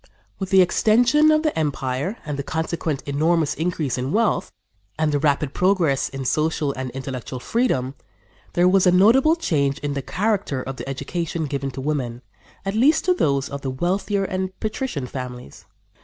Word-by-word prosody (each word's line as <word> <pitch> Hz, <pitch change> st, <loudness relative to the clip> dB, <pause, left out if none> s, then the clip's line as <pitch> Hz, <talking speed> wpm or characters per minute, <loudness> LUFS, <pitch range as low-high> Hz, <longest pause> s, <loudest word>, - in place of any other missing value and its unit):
" -, -, -39 dB
With 190 Hz, -2 st, -3 dB
the 190 Hz, 0 st, +6 dB
extension 240 Hz, -, +4 dB
of 310 Hz, 0 st, +3 dB
the 310 Hz, -, 0 dB
empire 145 Hz, -, -2 dB
and 150 Hz, -, -3 dB
the 140 Hz, -, -3 dB
consequent 160 Hz, -1 st, -3 dB
enormous 155 Hz, +2 st, +1 dB
increase 160 Hz, -6 st, -2 dB
in 130 Hz, +2 st, -2 dB
wealth 225 Hz, +3 st, +1 dB, 0.5 s
and 155 Hz, -1 st, +1 dB
the 145 Hz, -, +1 dB
rapid 145 Hz, -1 st, +1 dB
progress 180 Hz, -7 st, +2 dB
in 135 Hz, -1 st, -6 dB
social 155 Hz, 0 st, 0 dB
and 130 Hz, -1 st, -4 dB
intellectual 130 Hz, -1 st, -6 dB
freedom, 135 Hz, -, 0 dB, 0.6 s
there 175 Hz, +1 st, +4 dB
was 185 Hz, 0 st, +4 dB
a -, -, +6 dB
notable 235 Hz, -, +5 dB
change 140 Hz, -, 0 dB
in 145 Hz, -1 st, -3 dB
the 140 Hz, -, -2 dB
character 195 Hz, -, -1 dB
of 135 Hz, 0 st, -6 dB
the -, -, -6 dB
education 160 Hz, +4 st, -3 dB
given 140 Hz, -1 st, -3 dB
to 135 Hz, -, -7 dB
women, 130 Hz, -4 st, -3 dB, 0.4 s
at 195 Hz, -, -1 dB
least 265 Hz, +9 st, +3 dB
to 365 Hz, -, +4 dB
those 140 Hz, -, +1 dB
of 140 Hz, 0 st, -6 dB
the 135 Hz, -, -3 dB
wealthier 190 Hz, +8 st, -1 dB
and 190 Hz, 0 st, -3 dB
patrician 215 Hz, -, -3 dB
families. 125 Hz, -, -8 dB
155 Hz, 175 wpm, -22 LUFS, 135-195 Hz, 0.6 s, the